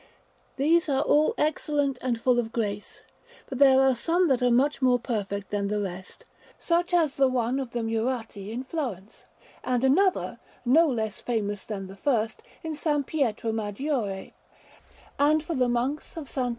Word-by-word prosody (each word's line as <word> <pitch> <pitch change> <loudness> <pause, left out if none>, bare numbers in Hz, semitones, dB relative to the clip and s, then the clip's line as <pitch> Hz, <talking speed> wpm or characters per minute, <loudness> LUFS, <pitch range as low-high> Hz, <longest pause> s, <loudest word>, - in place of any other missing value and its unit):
These 325 +4 +2
are 270 -1 +2
all 300 +1 +3
excellent 290 -3 0
and 240 -3 -1
full 245 +1 +3
of 225 -2 -2
grace, 210 -3 -4 0.4
but 265 - -6
there 265 -2 +7
are 265 -1 +4
some 335 +8 +1
that 260 -2 +2
are 250 - +3
much 270 +4 +2
more 250 -1 +4
perfect 205 -4 -4
than 205 -1 -1
the 210 +1 -1
rest, 185 -2 -6 0.3
such 345 +1 0
as 330 -5 +3
the 270 -1 +5
one 255 0 0
of 265 -3 -4
the 235 -1 -3
Murate 225 0 -2
in 245 +3 -4
Florence, 245 - -5 0.4
and 250 -1 0
another, 360 +9 +2 0.3
no 315 +7 +5
less 220 -6 -2
famous 205 -4 -2
than 200 -3 -5
the 190 +1 -10
first, 225 -1 -1 0.2
in 320 - -3
S. 310 +1 -5 0.2
Pietro 235 -7 -1
Maggiore; 215 -1 -3 0.9
and 300 +2 +3
for 335 - -4
the 255 -4 +1
Monks 255 +7 -2
of 325 - -4
SS. 255 -2 -2
250 Hz, 170 wpm, -26 LUFS, 220-285 Hz, 0.9 s, there